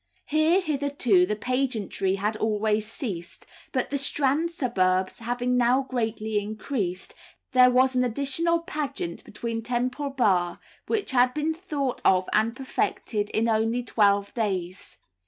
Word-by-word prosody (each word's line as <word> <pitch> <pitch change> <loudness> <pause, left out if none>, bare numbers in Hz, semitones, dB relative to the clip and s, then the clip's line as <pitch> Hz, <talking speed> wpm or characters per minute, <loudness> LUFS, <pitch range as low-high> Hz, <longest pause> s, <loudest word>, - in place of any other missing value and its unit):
Here, 310 +4 +3
hitherto, 280 - +2
the 210 - -1
pageantry 220 -5 -1
had 210 +2 -1
always 215 0 0
ceased, 185 - -6 0.3
but 255 -1 -1
the 280 - 0
Strand 285 +4 +1
suburbs 190 - 0
having 245 +2 -1
now 250 +2 +3
greatly 220 -4 -2
increased, 205 -3 -4 0.4
there 255 0 +6
was 255 +1 +3
an 250 - +3
additional 280 +7 +1
pageant 290 - -4
beyond 230 -1 -4
Temple 255 +4 -1
Bar, 190 -10 +1 0.3
which 425 -8 -1
had 250 0 +3
been 305 +1 0
thought 300 -7 -3
of 185 -1 +3
and 225 +2 +2
perfected 220 -5 -2
in 225 +1 0
only 225 +2 +1
twelve 200 -3 +2
days. 190 -5 -3
240 Hz, 135 wpm, -26 LUFS, 210-275 Hz, 0.4 s, there